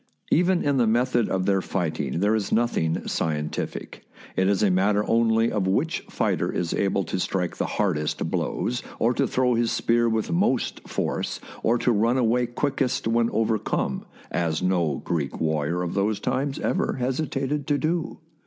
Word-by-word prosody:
Even 180 +2 +3
in 140 -1 +2
the 120 -3 +3
method 120 +1 +2
of 95 -1 0
their 95 -1 +2
fighting 80 -5 -2
there 105 +2 +3
is 105 -3 -1
nothing 110 -9 +1
scientific; 75 -2 -3 0.3
it 95 - +2
is 100 0 +2
a 100 - +4
matter 100 +3 +2
only 115 0 +3
of 100 -3 0
which 155 - +1
fighter - - 0
is 85 -1 -2
able 100 0 +1
to 95 - -3
strike 90 -1 -1
the - - -1
hardest 80 -8 0
blows, 120 0 -1 0.2
or 120 +2 +2
to - - +1
throw 125 -1 +2
his 115 0 +1
spear 120 0 +2
with 110 +4 -1
most 170 - 0
force, - - -2 0.2
or 120 +2 +2
to 120 - +1
run 115 +3 +2
away 120 0 +2
quickest 130 0 -1
when 115 0 +2
overcome 110 -1 -1
— - - -23
as 85 0 -1
no 85 -6 +1
Greek 75 -6 -2
warrior 80 +2 0
of 85 - -3
those 100 +2 0
times 140 +2 -1
ever - - 0
hesitated 135 +2 -2
to 145 - +2
do. 160 +2 -1
110 Hz, 170 wpm, -25 LUFS, 90-125 Hz, 0.3 s, a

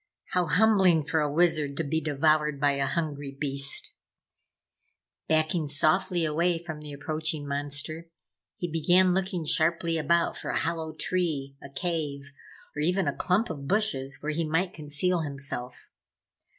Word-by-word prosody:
How 180 -2 +1
humbling 185 -2 +4
for 160 +1 0
a 150 -1 0
Wizard 155 -3 +2
to 165 - 0
be 160 +2 -1
devoured 150 0 +1
by 145 0 +3
a 140 0 -1
hungry 145 -4 -3
beast. 140 -2 0 1.3
Backing 155 0 +1
softly 165 +4 +1
away 170 +3 +1
from 160 -2 -7
the 150 -1 -9
approaching 155 +1 -3
monster, 145 +3 -4 0.5
he 175 - -3
began 175 +3 +3
looking 185 -3 -1
sharply 165 +1 +2
about 170 +2 +2
for - - -5
a - - 0
hollow 160 -1 -2
tree, 155 -6 -2
a 140 - -10
cave 140 -2 -3 0.4
or 150 - -2
even 180 +5 +1
a - - 0
clump 190 +3 +1
of 140 -3 -7
bushes 140 -10 0
where 155 - -1
he 165 +2 -1
might 170 +4 0
conceal 155 +4 0
himself. 140 -4 -3
155 Hz, 150 wpm, -27 LUFS, 145-170 Hz, 1.3 s, humbling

